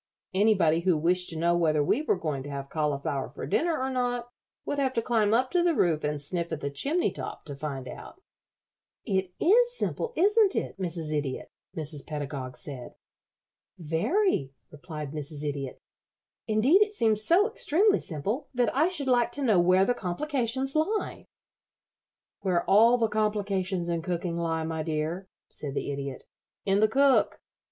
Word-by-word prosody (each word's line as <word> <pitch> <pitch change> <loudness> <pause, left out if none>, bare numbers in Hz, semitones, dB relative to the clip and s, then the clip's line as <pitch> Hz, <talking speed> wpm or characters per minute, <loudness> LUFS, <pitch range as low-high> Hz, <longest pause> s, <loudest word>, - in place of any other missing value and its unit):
Anybody 190 -5 +3
who 175 -1 +2
wished 180 +3 +1
to 165 - -4
know 170 +2 +2
whether 155 -3 +2
we 210 - +1
were 310 - +1
going 155 -6 -3
to 145 - -8
have 140 -1 -6
cauliflower 145 -3 -1
for - - -7
dinner 320 - +1
or 265 +1 -1
not 245 -1 -1 0.4
would 285 - -2
have 265 -2 +1
to 230 - +1
climb 220 -4 +2
up 255 +3 +2
to 355 - +3
the 345 -2 +2
roof 165 - +2
and 150 0 -1
sniff 170 +4 -3
at 160 - -3
the 140 -1 -3
chimney 295 - 0
top - - -7
to 145 -3 -6
find 135 -2 -5
out." 330 - -10 0.9
"It 190 -4 -1
is 480 +7 +4
simple, 475 - -2
isn't 410 +2 +4
it, - - -3
Mrs. 165 -4 -3
Idiot?" 140 -3 -3 0.3
Mrs. 150 -2 -1
Pedagog 140 -4 -5
said. 130 -4 -8 0.8
"Very," 165 - 0 0.2
replied 150 -2 -7
Mrs. 150 -1 -6
Idiot. 140 -2 -4 0.7
"Indeed, 245 - +4
it 420 0 +3
seems 220 - +1
so 365 - +4
extremely 415 -2 +2
simple 205 - -4
that 245 -2 +1
I 305 +5 +4
should 345 -6 -3
like 240 -2 +3
to 285 - -3
know 215 -8 +4
where 185 +2 +4
the 245 - +2
complications 260 - -2
lie." 405 +8 -1 1.1
"Where 180 -3 0
all 230 +5 +6
the 230 -2 +2
complications 200 -4 -1
in 170 -1 -1
cooking 175 0 -3
lie, 165 -1 -1
my 160 0 -3
dear," 160 +4 -3 0.2
said 140 -2 -6
the - - -2
Idiot, 140 -1 -5 0.4
"in 195 0 +2
the 215 - +5
cook. 275 +4 +3
185 Hz, 170 wpm, -27 LUFS, 155-255 Hz, 1.1 s, all